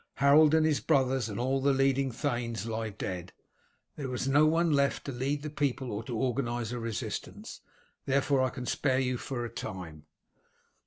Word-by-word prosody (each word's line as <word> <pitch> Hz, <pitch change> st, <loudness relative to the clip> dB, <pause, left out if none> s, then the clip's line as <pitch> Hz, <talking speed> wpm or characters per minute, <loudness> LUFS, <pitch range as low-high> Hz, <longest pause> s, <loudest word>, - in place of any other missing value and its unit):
Harold 145 Hz, +3 st, +6 dB
and 160 Hz, -1 st, +4 dB
his 155 Hz, -2 st, +2 dB
brothers 130 Hz, -5 st, +1 dB
and 105 Hz, -, -5 dB
all 135 Hz, +2 st, 0 dB
the 140 Hz, +1 st, +3 dB
leading 135 Hz, 0 st, +2 dB
thanes 120 Hz, -5 st, -2 dB
lie 110 Hz, -1 st, -3 dB
dead. 90 Hz, -3 st, -5 dB, 0.6 s
There 135 Hz, -4 st, -4 dB
is 125 Hz, -, -2 dB
no 145 Hz, +3 st, +5 dB
one 165 Hz, +1 st, +2 dB
left 140 Hz, -1 st, +1 dB
to 140 Hz, -, -3 dB
lead 135 Hz, +3 st, -2 dB
the 150 Hz, -, -5 dB
people 135 Hz, -4 st, -1 dB
or 105 Hz, +2 st, -4 dB
organize 120 Hz, -1 st, -1 dB
a 125 Hz, -, -3 dB
resistance, 115 Hz, -2 st, -5 dB, 0.5 s
therefore 140 Hz, 0 st, +2 dB
I 130 Hz, -, +2 dB
can 125 Hz, 0 st, -7 dB
spare 130 Hz, +1 st, +1 dB
you 130 Hz, -1 st, 0 dB
for 120 Hz, -3 st, -4 dB
a -, -, -5 dB
time." 80 Hz, -5 st, -7 dB
130 Hz, 175 wpm, -30 LUFS, 115-140 Hz, 0.6 s, Harold